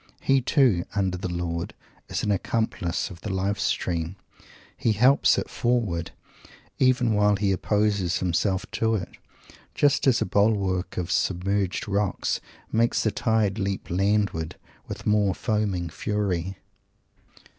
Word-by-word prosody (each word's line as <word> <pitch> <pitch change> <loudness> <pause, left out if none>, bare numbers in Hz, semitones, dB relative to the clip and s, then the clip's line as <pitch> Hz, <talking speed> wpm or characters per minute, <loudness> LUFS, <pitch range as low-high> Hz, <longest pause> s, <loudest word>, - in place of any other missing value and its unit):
He, 135 0 +3
too, 125 - +3
under 95 -3 0
the 90 0 -4
Lord, 85 -1 -3 0.3
is - - -2
an 105 - +1
accomplice 100 -3 -1
of 85 -2 -11
the - - -5
Life 95 +2 -1
stream. 85 0 -1 0.6
He 115 - +1
helps 125 +7 +4
it - - -2
forward, 115 -9 -1 0.7
even 125 -3 +3
while 105 0 +3
he 100 0 +1
opposes 100 -2 +1
himself 95 +2 0
to 115 -1 +1
it, 95 -4 -3 0.7
just 145 -1 +3
as 130 - +4
a - - 0
bulwark 100 -2 +1
of 90 -1 -2
submerged 95 +1 0
rocks 100 -1 -1 0.3
make 115 +1 +2
the 110 - +1
tide 110 -3 +1
leap 100 -3 -3
landward 95 -3 0 0.3
with - - -7
more 105 -3 +2
foaming 105 -6 -1
fury! 95 0 -2
100 Hz, 135 wpm, -25 LUFS, 90-110 Hz, 0.7 s, helps